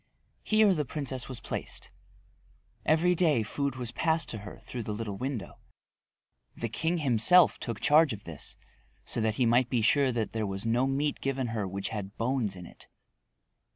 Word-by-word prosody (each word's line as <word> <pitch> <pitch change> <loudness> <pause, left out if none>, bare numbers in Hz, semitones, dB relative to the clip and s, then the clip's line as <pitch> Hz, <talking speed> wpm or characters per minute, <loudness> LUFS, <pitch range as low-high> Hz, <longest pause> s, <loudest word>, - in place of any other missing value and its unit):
Here 215 -2 +4
the 155 -4 0
princess 135 -3 -4
was 130 -3 -4
placed. - - -4 1.0
Every 165 +3 +4
day 160 -9 +4
food 140 +4 -2
was 125 -2 -4
passed 160 +5 0
to 110 - -2
her 105 +1 -9
through 125 - -5
the 105 -1 -4
little 105 -2 -4
window. 130 -7 -5 1.0
The 115 - -3
king 160 +10 -1
himself 150 +5 +5
took 115 -4 -4
charge 155 0 +5
of 105 -2 -6
this, 85 -3 -8 0.5
so - - -1
that 110 -1 0
he 125 - +2
might 120 +2 +3
be 120 -4 +1
sure 135 +3 +3
that 115 -3 -2
there 110 -2 -1
was 95 +2 -3
no 120 +3 +2
meat 140 +2 -1
given 135 -2 -1
her 110 -4 -2
which 95 +1 -4
had 105 -3 -6
bones 115 -4 -1
in 90 -1 -9
it. - - -15
120 Hz, 180 wpm, -29 LUFS, 110-145 Hz, 1.0 s, himself